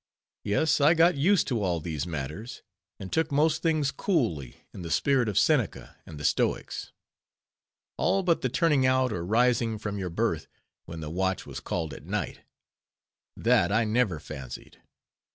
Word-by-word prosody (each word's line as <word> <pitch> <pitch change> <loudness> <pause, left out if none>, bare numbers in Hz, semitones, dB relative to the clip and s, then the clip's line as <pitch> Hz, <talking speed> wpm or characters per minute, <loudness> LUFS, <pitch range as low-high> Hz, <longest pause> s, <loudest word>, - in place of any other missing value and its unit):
Yes, 145 +9 +1
I 150 +4 +6
got 170 +2 +5
used 175 +7 +3
to 120 -5 0
all 90 -4 0
these 80 -1 -4
matters, 80 - -6 0.4
and 95 -2 -7
took 160 -1 +1
most 150 +2 +2
things 155 -4 +1
coolly, 105 - -2
in - - -8
the 85 - -6
spirit 130 - +2
of 100 - -3
Seneca - - +1
and 75 -3 -9
the 75 - -5
stoics. - - -1 1.1
All 195 - +1
but 170 -2 +2
the 130 - 0
"turning 150 -1 +2
out" 130 -2 +2
or 85 - -3
rising 115 +2 +2
from 105 -1 -4
your 95 -2 -3
berth 85 - -1 0.4
when 85 -1 -8
the 75 -1 -5
watch 95 +2 -1
was - - -7
called 80 -3 -3
at - - -10
night—that 85 - -3
I 110 +3 +3
never 110 -6 +1
fancied. 65 -4 -9
110 Hz, 160 wpm, -27 LUFS, 85-140 Hz, 1.1 s, I